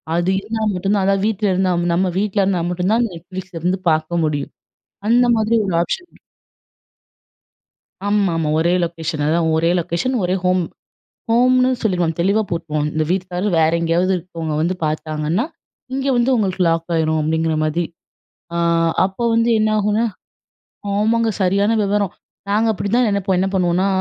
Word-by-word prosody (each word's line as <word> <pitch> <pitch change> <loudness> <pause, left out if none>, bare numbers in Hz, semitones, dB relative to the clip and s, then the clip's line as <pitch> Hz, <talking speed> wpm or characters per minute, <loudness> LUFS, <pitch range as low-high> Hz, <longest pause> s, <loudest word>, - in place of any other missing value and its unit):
அது 175 +2 +1
இருந்தா 220 +2 -4
மட்டுந்தான் 195 +2 0
அதாவது 195 0 +1
வீட்ல 215 -1 0
இருந்தா 185 0 +1 0.2
நம்ம 185 +2 +1
வீட்ல 205 0 +1
இருந்தா 190 -2 +1
மட்டும்ந்தான் 195 +7 +1
Netflixலருந்து 180 +1 -4
பாக்க 155 +1 0
முடியும். 145 -2 -3 0.6
அந்த 245 +2 +4
மாதிரி 220 +1 +2
ஒரு 185 - -2
ஆப்ஷன் 355 - -4 2.0
ஆமாமா. 185 -7 +1
ஒரே 170 +2 +2
லொக்கேஷன் 165 -2 -3
அதா 165 +2 +2 0.2
ஒரே 165 +1 +2
லொக்கேஷன் 175 +10 -1
ஒரே 180 +1 +1
ஹோம். 180 0 +2 0.7
ஹோம்னு 255 +2 +4
சொல்லிருவோம் 175 -7 0
தெளிவா 200 +5 +2
போட்ருவோம். 155 -3 -2
இந்த 155 0 0
வீட்டுக்காரு 185 +1 -2
வேற 160 0 +3
எங்கயாவது 170 +3 +1
இருக்கவங்க 165 -3 -5
வந்து 170 +3 +1
பாத்தாங்கன்னா, 155 - -1 0.5
இங்க 270 +1 -2
வந்து 240 +2 +2
உங்களுக்கு 195 -5 -1
லாக் 165 +1 -1
ஆயிரும் 160 -1 +1
அப்டிங்கிற 160 +1 0
மாதி. 155 +3 0 0.7
அ - - 0 0.5
அப்ப 190 +2 -7
வந்து 230 +1 +2
என்னாகுனா 215 +1 +1 0.9
ஆமாங்க. 225 +3 +2
சரியான 200 +4 +2
வெவரம். 200 -1 0 0.4
நாங்க 215 +3 +2
அப்புடிதான் 225 +4 +1
நெனைப்போம். 195 -2 0
என்ன 190 - +1
பண்ணுவோன்னா, 180 +1 +2
185 Hz, 135 wpm, -19 LUFS, 165-210 Hz, 2.0 s, அந்த